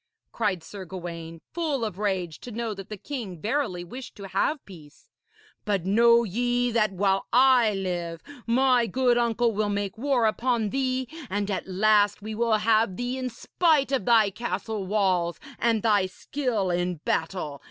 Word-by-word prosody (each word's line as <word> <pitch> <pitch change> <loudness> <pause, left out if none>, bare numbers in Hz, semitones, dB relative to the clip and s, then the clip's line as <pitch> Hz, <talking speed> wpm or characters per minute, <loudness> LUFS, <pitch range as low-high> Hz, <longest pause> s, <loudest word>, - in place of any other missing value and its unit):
cried 200 -7 -1
Sir 195 +3 -8
Gawaine, 170 -2 -7
full 305 -8 -1
of 205 -3 -6
rage 185 -6 -2
to 245 - -9
know 230 0 -3
that 195 -2 -9
the 210 - -6
king 210 - -6
verily 215 - -1
wished 250 +9 -9
to 200 -2 -9
have 195 +11 +1
peace; 155 -7 -15 0.5
'but 200 -5 -1
know 235 +4 +5
ye 245 +3 0
that 215 -3 +2
while 195 0 +1
I 245 -4 +5
live, 175 -3 -3 0.2
my 250 0 +3
good 250 0 +2
uncle 235 0 +2
will 210 0 -1
make 205 +1 -3
war 260 -3 +2
upon 225 -1 +1
thee, 260 -1 -1 0.2
and 205 +1 -1
at 190 - -3
last 205 +1 +3
we 215 +1 -6
will 225 0 +2
have 215 -3 +2
thee 245 +1 -2
in 255 -1 -2
spite 290 +3 +1
of 260 -8 0
thy 220 -4 +5
castle 205 -1 -4
walls 185 -4 +1 0.2
and 225 -2 +1
thy 205 -4 +3
skill 215 -1 -2
in 175 +1 0
battle. 160 -4 -2
215 Hz, 165 wpm, -26 LUFS, 190-240 Hz, 0.5 s, know